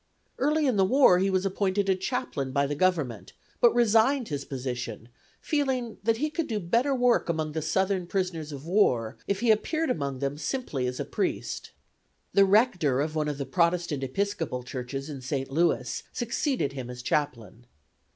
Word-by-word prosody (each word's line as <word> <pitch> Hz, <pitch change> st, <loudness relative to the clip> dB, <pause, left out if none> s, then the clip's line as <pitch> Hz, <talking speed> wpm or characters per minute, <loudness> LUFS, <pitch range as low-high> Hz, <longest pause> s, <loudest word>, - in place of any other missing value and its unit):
Early 300 Hz, +3 st, +2 dB
in 255 Hz, -6 st, +2 dB
the 195 Hz, -, +5 dB
war 190 Hz, -3 st, +5 dB
he 195 Hz, +1 st, +2 dB
was 190 Hz, 0 st, +1 dB
appointed 195 Hz, 0 st, 0 dB
a 190 Hz, -, +3 dB
chaplain 190 Hz, -, -3 dB
by 140 Hz, +2 st, +2 dB
the 145 Hz, -, -2 dB
Government, 150 Hz, -, 0 dB, 0.3 s
but 240 Hz, -, +6 dB
resigned 240 Hz, +2 st, +3 dB
his 140 Hz, -2 st, -3 dB
position, 125 Hz, -4 st, -5 dB, 0.3 s
feeling 265 Hz, -6 st, -1 dB
that 225 Hz, +1 st, +2 dB
he 305 Hz, +5 st, -1 dB
could 310 Hz, +1 st, -2 dB
do 220 Hz, -4 st, -1 dB
better 235 Hz, +10 st, +1 dB
work 245 Hz, -6 st, +2 dB
among 160 Hz, -2 st, -1 dB
the 160 Hz, +1 st, -3 dB
Southern 185 Hz, +3 st, 0 dB
prisoners 175 Hz, -5 st, -2 dB
of 140 Hz, 0 st, -8 dB
war 125 Hz, -, +2 dB
if 200 Hz, +1 st, -1 dB
he 235 Hz, -2 st, +4 dB
appeared 310 Hz, +7 st, +1 dB
among 140 Hz, -, -2 dB
them 140 Hz, +2 st, -3 dB
simply 150 Hz, -, -2 dB
as 125 Hz, 0 st, -4 dB
a -, -, -2 dB
priest. -, -, -3 dB, 0.6 s
The 200 Hz, -, +6 dB
rector 190 Hz, -, +3 dB
of 155 Hz, +2 st, -1 dB
one 155 Hz, -1 st, 0 dB
of 145 Hz, -2 st, -2 dB
the 140 Hz, -, -3 dB
Protestant 170 Hz, -1 st, +1 dB
Episcopal 160 Hz, -3 st, -2 dB
churches 130 Hz, +2 st, -5 dB
in 140 Hz, -4 st, -7 dB
St. 135 Hz, +1 st, -3 dB
Louis 135 Hz, -6 st, +1 dB
succeeded 240 Hz, -, -1 dB
him 130 Hz, -3 st, -6 dB
as 125 Hz, 0 st, -8 dB
chaplain. 120 Hz, -5 st, -2 dB
170 Hz, 180 wpm, -27 LUFS, 135-225 Hz, 0.6 s, but